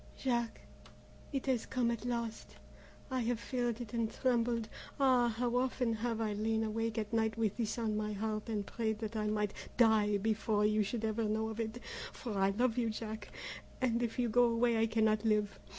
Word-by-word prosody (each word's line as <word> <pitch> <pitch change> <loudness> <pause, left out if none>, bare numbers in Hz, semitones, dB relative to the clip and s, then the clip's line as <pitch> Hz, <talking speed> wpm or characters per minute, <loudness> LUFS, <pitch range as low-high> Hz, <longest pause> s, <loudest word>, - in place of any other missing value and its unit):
"Jack, 235 -3 -1 0.7
it 275 -3 -2
has 260 -4 0
come 245 -2 +1
at 230 -1 -4
last. 235 -2 -3 0.6
I 260 - +1
have 240 -1 0
feared 240 -1 -1
it 230 -2 -7
and 230 -2 0
trembled, 235 -3 +1 0.3
ah! 255 -3 +5
how 240 +1 -1
often 250 -2 +1
have 225 0 -2
I 215 -2 0
lain 220 +2 0
awake 225 +1 -1
at 215 0 -2
night 220 0 +1
with 220 -3 +1
this 225 -2 -1
on 220 -2 0
my 215 0 -1
heart 215 +2 -3
and 210 -3 -1
prayed 220 -1 -1
that 220 0 -5
I 215 -1 0
might 210 -1 0 0.2
die 215 -3 +5
before 215 0 +1
you 215 0 +3
should 220 +2 -1
ever 220 +1 0
know 220 +1 0
of 220 0 -6
it! 225 +1 -3 0.3
For 230 -5 -5
I 195 0 +3
love 240 +4 +1
you, 230 -2 +1
Jack, 220 -1 -5 0.5
and 240 -2 +1
if 235 -2 -2
you 245 -1 +2
go 245 +2 +5
away 235 0 +3
I 225 - +3
cannot 220 -1 +2
live. 210 -2 +1
225 Hz, 200 wpm, -34 LUFS, 215-240 Hz, 0.7 s, ah